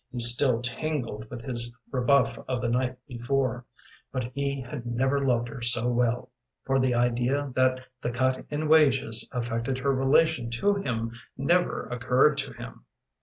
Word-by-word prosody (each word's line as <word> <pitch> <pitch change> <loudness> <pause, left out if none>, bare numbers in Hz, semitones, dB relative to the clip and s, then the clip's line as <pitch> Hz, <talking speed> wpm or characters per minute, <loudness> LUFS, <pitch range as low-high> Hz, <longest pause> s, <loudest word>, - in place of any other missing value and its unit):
He 125 - -5
still 120 +1 +5
tingled 125 -5 -3
with 120 -1 -8
his 120 -2 -3 0.2
rebuff 135 +2 +2
of 130 -2 -1
the 120 -1 -1
night 125 +1 0
before, 125 -1 -1 0.5
but 130 -1 -2
he 140 0 -2
had 125 -2 -7
never 130 +4 0
loved 120 -3 +1
her 125 -2 -8
so 120 0 0
well, 120 +1 0 0.3
for 135 0 +2
the 130 -2 +2
idea 125 +4 0
that 130 0 +2 0.2
the - - -1
cut 130 +2 0
in 150 +1 -2
wages 135 -7 +3
affected 120 +1 -2
her 135 +1 +1
relation 135 -1 +2
to 120 +13 +1
him 115 - -2 0.3
never 175 +7 +1
occurred 125 +4 +2
to 135 -1 -3
him. 120 0 -10
125 Hz, 160 wpm, -27 LUFS, 120-135 Hz, 0.5 s, still